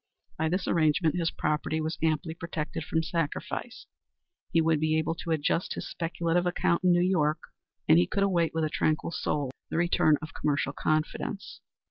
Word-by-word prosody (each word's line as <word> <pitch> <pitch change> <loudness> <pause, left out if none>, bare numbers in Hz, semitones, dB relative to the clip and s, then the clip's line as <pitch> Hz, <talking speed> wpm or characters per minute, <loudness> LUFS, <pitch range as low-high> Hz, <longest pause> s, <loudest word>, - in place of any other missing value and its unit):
By 160 0 +1
this 180 +3 -1
arrangement 160 0 +2
his 170 -2 +1
property 150 +1 -1
was 160 +1 -3
amply 160 0 0
protected 165 -2 -4
from 160 +1 0
sacrifice; 165 -2 -3 0.7
he 165 - +3
would 160 -1 +3
be 155 +1 +2
able 160 +1 0
to 170 - -8
adjust 160 +2 0
his - - -5
speculative 170 +1 -1
account 175 0 +1
in 180 - +5
New 175 0 +4
York; 155 -5 +2 0.5
and 80 - +7
he 90 - +3
could 200 - 0
await 175 -4 +2
with 160 0 -1
a 155 - +1
tranquil 155 +1 0
soul 145 -4 -1 0.2
the - - -2
return 170 -3 +3
of 155 -2 -8
commercial 140 -2 0
confidence. 155 +7 -2
160 Hz, 175 wpm, -28 LUFS, 155-170 Hz, 0.7 s, and